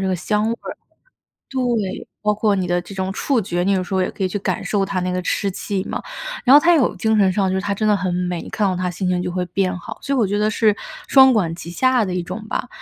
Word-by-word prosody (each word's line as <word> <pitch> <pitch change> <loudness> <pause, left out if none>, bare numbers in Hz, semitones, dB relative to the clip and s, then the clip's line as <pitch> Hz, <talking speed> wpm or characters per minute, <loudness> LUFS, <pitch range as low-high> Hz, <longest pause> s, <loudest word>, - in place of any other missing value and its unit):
这 195 - -1
个 185 - 0
香 210 +4 0
味 230 - 0 0.2
儿 - - -8 0.7
对， 240 -7 -2 0.2
包 210 0 +3
括 210 -1 +1
你 190 -2 -1
的 175 0 +1
这 180 +3 -11
种 190 0 -2
触 265 +5 +1
觉， 175 -2 -2
你 195 - +1
有 190 -2 +1
时 180 - -7
候 190 - +2
也 180 - 0
可 195 - -4
以 - - +2
去 185 - -3
感 190 - -2
受 205 -2 0
它 190 -1 -2
那 180 0 -1
个 180 0 -2
湿 200 +3 0
气 190 +1 -3
嘛。 - - -4 0.4
然 260 - +7
后 290 - +10
它 345 +3 +4
有 280 -6 +2
精 220 -1 +1
神 195 -2 +4
上 195 +1 +1
就 190 - 0
是 190 - 0
它 200 +1 -1
真 215 +2 -1
的 210 - +4
很 185 -2 -1
美， 180 -1 -2
一 - - -9
看 210 - 0
到 185 - -1
它 180 0 -1
心 185 +1 -3
情 180 -1 +1
就 180 - -3
会 180 0 -2
变 185 +1 -1
好， - - -8
所 280 - -2
以 - - 0
我 225 - +3
觉 205 +2 -1
得 210 0 +2
是 215 -1 +3 0.3
双 265 -1 +7
管 180 -8 +1
齐 170 - -9
下 255 +5 +2
的 185 - -3
一 180 - -1
种 215 +5 -7
吧。 - - -2
195 Hz, 320 characters per minute, -20 LUFS, 180-215 Hz, 0.7 s, 后